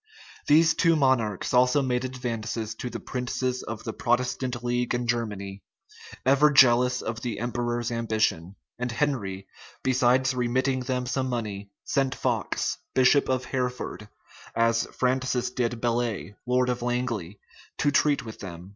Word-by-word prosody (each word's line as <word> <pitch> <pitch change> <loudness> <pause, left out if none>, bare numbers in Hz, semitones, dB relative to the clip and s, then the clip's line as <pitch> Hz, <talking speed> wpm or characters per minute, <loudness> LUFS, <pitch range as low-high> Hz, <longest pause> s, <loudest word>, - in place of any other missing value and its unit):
These 160 +2 +6
two 165 +1 +3
monarchs 130 - +1
also 125 +3 +4
made 125 -1 0
advances 115 -3 -3
to 125 - -5
the - - -6
princes 125 0 -2
of 110 -1 -6
the 110 - -4
Protestant 125 +1 -1
league 120 0 0
in 120 0 -2
Germany, 105 -5 -3 0.6
ever 140 +3 +5
jealous 125 -2 +5
of 115 0 -4
the 120 -4 -3
emperor's 120 0 -2
ambition; 110 -6 -1 0.2
and 125 0 -2
Henry, 110 -8 -2 0.4
besides 130 0 +3
remitting 130 +2 0
them 125 0 -2
some 130 +1 -1
money, 105 -5 -4
sent 135 -1 0
Fox, 120 -7 -1 0.2
bishop 130 +2 +4
of 130 0 0
Hereford, 125 -4 -3 0.5
as 115 0 +2
Francis 130 -1 0
did 120 -2 -1
Bellay, 115 -4 -1
lord 125 0 +2
of 125 -1 -1
Langley, 120 -6 -2 0.4
to 145 - +2
treat 145 -2 +2
with 110 - -9
them. 90 -1 -8
125 Hz, 140 wpm, -26 LUFS, 115-130 Hz, 0.6 s, These